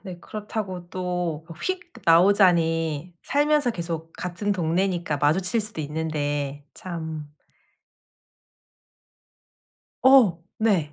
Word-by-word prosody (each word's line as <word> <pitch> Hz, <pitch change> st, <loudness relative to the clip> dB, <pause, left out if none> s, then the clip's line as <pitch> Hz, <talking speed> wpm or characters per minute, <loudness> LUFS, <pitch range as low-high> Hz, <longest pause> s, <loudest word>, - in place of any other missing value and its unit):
네. 185 Hz, -4 st, -8 dB
그렇다고 195 Hz, -3 st, -5 dB
또 180 Hz, -4 st, -3 dB, 0.2 s
휙 360 Hz, -2 st, -3 dB
나오자니 165 Hz, -3 st, +3 dB
살면서 290 Hz, -2 st, +2 dB
계속 165 Hz, -4 st, -5 dB
같은 180 Hz, +3 st, -2 dB
동네니까 175 Hz, -2 st, 0 dB
마주칠 180 Hz, +9 st, +2 dB
수도 215 Hz, -6 st, -4 dB
있는데. 145 Hz, -2 st, -3 dB
참. 160 Hz, -4 st, -6 dB, 2.7 s
어! 240 Hz, -11 st, +6 dB, 0.2 s
네. 190 Hz, -9 st, +1 dB
175 Hz, 180 characters per minute, -25 LUFS, 160-200 Hz, 2.7 s, 어